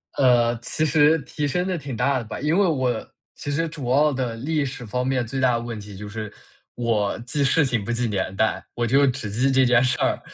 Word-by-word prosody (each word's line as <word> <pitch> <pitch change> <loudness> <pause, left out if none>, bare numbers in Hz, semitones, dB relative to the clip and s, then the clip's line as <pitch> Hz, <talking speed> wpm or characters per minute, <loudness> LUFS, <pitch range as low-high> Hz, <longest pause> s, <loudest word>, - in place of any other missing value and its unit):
呃， 120 -3 +3
其 155 +5 -1
实 155 +1 +4
提 145 0 -3
升 180 +6 -1
得 185 -2 -1
挺 140 -5 -6
大 140 +4 +1
的 120 - -3
吧。 110 - -6
因 150 +6 +1
为 200 - +4
我 130 -7 -1 0.3
其 145 - -5
实 165 +3 0
主 145 -6 -6
要 150 +2 +4
的 125 -3 -2
历 145 +4 -1
史 130 -2 -6
方 125 +4 -2
面 130 -2 0
最 130 +3 -4
大 130 -2 +3
的 115 - 0
问 115 -2 -6
题 105 -1 -10
就 105 +2 -8
是 105 -1 -6 0.4
我 115 -4 0
记 140 +4 -2
事 145 +3 +3
情 115 -5 -1
不 120 - -3
记 120 0 0
年 95 -2 -2
代， 110 +2 0
我 120 -1 0
就 140 +4 +4
只 125 -5 -2
记 125 +6 +1
这 130 -1 +4
件 120 0 +4
事 130 - +1
儿。 - - +1
125 Hz, 260 characters per minute, -23 LUFS, 115-145 Hz, 0.4 s, 实